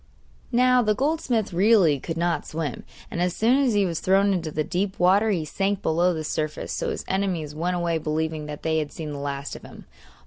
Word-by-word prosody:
Now 250 +1 +4
the 215 -2 +1
goldsmith 255 - 0
really 185 -6 +4
could 165 +4 -5
not 170 0 -1
swim, 155 -5 -4 0.3
and 170 - -2
as 180 0 0
soon 240 +5 +3
as 255 -6 +2
he 200 -1 +3
was 170 -3 -2
thrown 195 +1 +3
into 170 -4 -2
the 155 0 -1
deep 190 +4 -2
river 195 +5 +4
he 175 -7 0
sank 195 +5 -1
below 175 +3 +2
the 160 -2 -3
surface; 155 0 -3
so - - -2
his - - -4
enemies 185 -6 -1
went 175 +4 -1
away 170 -2 0
believing 155 0 -2
that 150 -1 -7
they 160 0 +1
had 150 -2 -4
seen 155 -2 -6
the 145 - -5
last 140 0 -4
of - - -10
him. - - -13
175 Hz, 215 wpm, -24 LUFS, 155-200 Hz, 0.3 s, Now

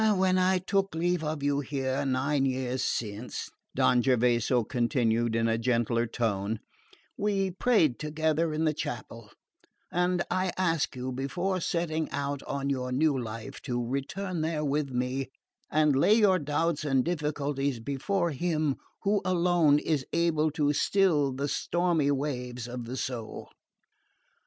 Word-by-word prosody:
When 185 0 +3
I 185 +1 +3
took 195 0 0
leave 175 0 0
of 155 -2 -3
you 145 0 +2
here 135 -1 -2
nine 135 +2 +1
years 130 -1 -1
since," 110 +2 -3 0.2
Don 125 -1 +4
Gervaso 125 -1 +2
continued 120 -1 +1
in 115 0 +2
a 115 0 +1
gentler 115 -1 +1
tone, 110 -2 -1 0.6
"we 195 -2 +1
prayed 180 - +2
together 155 +1 0
in 155 +1 0
the 155 - +2
chapel; 115 -5 -6 0.6
and 180 0 +1
I 185 -1 0
ask 165 -6 +1
you, 130 +1 -4
before 175 +9 -2
setting 160 -2 -1
out 140 0 -3
on 140 0 -2
your 130 -2 -1
new 145 +3 +2
life, 115 -3 -6
to 120 -3 -2
return 165 +7 -3
there 155 -1 -1
with 145 0 0
me 130 +1 -2 0.4
and 150 -2 +3
lay 170 +10 +5
your 200 -5 +4
doubts 150 +1 0
and 135 -4 +2
difficulties 145 -5 -1
before 165 - -1
Him 155 -2 0 0.3
who 200 0 +2
alone 175 -4 +3
is 150 -2 0
able 165 -2 +2
to 150 -1 +1
still 155 -5 +2
the 140 +2 -2
stormy 175 -1 +1
waves 125 -4 -2
of 120 -1 -6
the 125 +3 -5
soul." 120 -5 -5
145 Hz, 145 wpm, -28 LUFS, 125-170 Hz, 0.6 s, lay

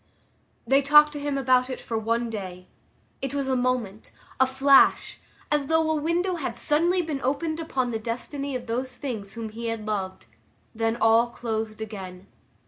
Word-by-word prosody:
They 275 +1 +4
talked 295 +2 +6
to 290 - -5
him 285 -1 -2
about 255 -1 +3
it 255 - -5
for 230 - -5
one 230 +1 -1
day; 185 -4 -7 0.6
it 270 0 -3
was 280 -1 -1
a 260 - +1
moment, 245 -5 -2 0.3
a 260 - +5
flash, 270 +1 +4 0.3
as 295 -2 +1
though 320 0 +2
a - - +1
window 350 +3 0
had 305 - -4
suddenly 345 +4 +2
been 300 -4 -4
opened 300 +5 -1
upon 260 -6 -2
the 225 - -2
destiny 265 +5 -4
of 250 -1 -4
those 250 +2 -3
things 220 -9 -5
whom 230 -2 -5
he 230 +2 -6
had 225 -2 -4
loved; 195 -3 -4 0.5
then 225 0 0
all 225 +2 +4
closed 220 -2 -4
again. 190 -4 -7
255 Hz, 175 wpm, -25 LUFS, 225-285 Hz, 0.6 s, talked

